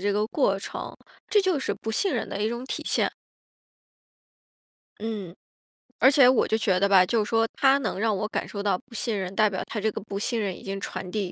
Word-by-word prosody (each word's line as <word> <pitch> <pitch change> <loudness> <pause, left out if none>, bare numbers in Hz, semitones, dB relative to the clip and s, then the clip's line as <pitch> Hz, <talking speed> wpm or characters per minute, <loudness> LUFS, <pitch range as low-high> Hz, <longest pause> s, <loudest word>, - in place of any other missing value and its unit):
这 205 +2 0
个 210 +1 +1
过 200 -10 +2
程， - - -6 0.3
这 415 - +4
就 370 -5 +1
是 270 - -2
不 220 - -5
信 370 - 0
任 - - -1
的 200 - -4
一 215 - +1
种 235 +2 -4
体 265 - -4
现。 - - +2 1.9
嗯， 205 -6 -4 0.7
而 265 - +7
且 275 -3 +7
我 255 - +3
就 220 - +1
觉 190 -4 +1
得 200 - +3
吧， 190 -2 +6
就 220 +1 +1
是 - - -8
说 225 0 +2
他 275 0 +4
能 220 -6 -3
让 220 -1 +1
我 210 - -2
感 - - -3
受 200 - -5
到 200 -3 +1
不 240 +5 -19
信 225 -2 -2
任， 185 -1 -4
代 215 -1 +4
表 190 - -3
他 215 - -4
这 220 0 +1
个 - - -5
不 200 -1 -5
信 235 +2 -1
任 200 -4 -2
已 - - -13
经 195 0 -4
传 185 - -6
递 195 -3 -2
215 Hz, 255 characters per minute, -26 LUFS, 195-235 Hz, 1.9 s, 而